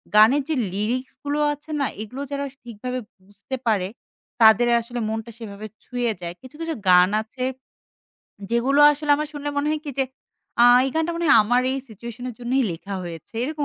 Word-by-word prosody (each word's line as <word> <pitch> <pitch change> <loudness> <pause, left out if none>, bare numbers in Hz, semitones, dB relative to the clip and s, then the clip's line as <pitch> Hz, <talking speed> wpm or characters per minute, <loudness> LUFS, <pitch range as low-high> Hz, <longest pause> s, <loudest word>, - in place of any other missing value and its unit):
গানের 225 +7 +7
যে 315 - +1 0.2
লিরিক্স 235 +6 -2
গুলো 290 +1 -1
আছে 295 +2 -14
না? 280 - +2 0.2
এগুলো 250 +6 -7
যারা 280 0 -2 0.2
ঠিকভাবে 250 +2 -5 0.3
বুঝতে 200 +6 -7
পারে 200 -5 +2 0.6
তাদের 220 +2 +7
আসলে 240 +1 -6
মনটা 225 +1 -4
সেভাবে 210 -2 -8 0.2
ছুঁয়ে 245 -2 -1
যায়। 170 0 -5
কিছু, 260 +2 -13
কিছু 330 -1 -2
গান 180 0 +7
আছে, 250 +3 -7 1.1
যেগুলো 255 +5 +3
আসলে 295 0 -3
আমার 300 0 -3
শুনলে 290 -1 -5
মনে 285 +1 +1
হয় 310 0 -1
কি 290 - -4
যে 270 - +3 0.6
আ 240 - +8 0.2
এই 270 - -1
গানটা 320 +1 0
মনে 340 0 -2
হয় - - +8
আমার 245 +3 +2
এই 270 - -1
সিচুয়েশনের 235 +3 -7
জন্যই 255 +2 +1
লেখা 195 +4 -7
হয়েছে। 170 +3 -9
এরকম 300 +1 -2
245 Hz, 180 wpm, -23 LUFS, 220-285 Hz, 1.1 s, আ